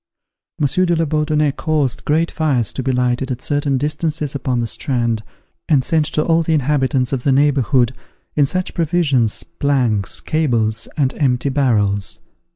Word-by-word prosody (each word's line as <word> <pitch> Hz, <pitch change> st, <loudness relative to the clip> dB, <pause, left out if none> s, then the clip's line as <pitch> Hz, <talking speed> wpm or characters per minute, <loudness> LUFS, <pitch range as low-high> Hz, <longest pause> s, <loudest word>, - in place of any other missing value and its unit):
Monsieur 150 Hz, +5 st, +1 dB
de 170 Hz, -, +2 dB
la 165 Hz, 0 st, +1 dB
Bourdonnais 150 Hz, -1 st, +1 dB
caused 145 Hz, -3 st, -1 dB
great 160 Hz, +3 st, +1 dB
fires 135 Hz, -9 st, 0 dB
to -, -, -2 dB
be 130 Hz, +1 st, -1 dB
lighted 125 Hz, +1 st, 0 dB
at 125 Hz, -2 st, -3 dB
certain 145 Hz, -1 st, 0 dB
distances 150 Hz, +1 st, -2 dB
upon 130 Hz, -3 st, -1 dB
the 120 Hz, -, 0 dB
strand, 120 Hz, -2 st, -1 dB, 0.5 s
and 140 Hz, -5 st, +4 dB
sent 155 Hz, +2 st, +1 dB
to 155 Hz, -, 0 dB
all 165 Hz, 0 st, +3 dB
the 160 Hz, 0 st, +1 dB
inhabitants 135 Hz, -3 st, 0 dB
of 130 Hz, -, -1 dB
the 140 Hz, -, +1 dB
neighbourhood, 135 Hz, -3 st, +2 dB, 0.4 s
in 145 Hz, -2 st, +3 dB
search 185 Hz, +4 st, -2 dB
of -, -, -17 dB
provisions, 150 Hz, -9 st, +1 dB
planks, 125 Hz, -9 st, 0 dB
cables, 115 Hz, -8 st, 0 dB
and 135 Hz, -3 st, +1 dB
empty 135 Hz, -1 st, +1 dB
barrels. 105 Hz, -8 st, 0 dB
140 Hz, 165 wpm, -18 LUFS, 125-150 Hz, 0.5 s, and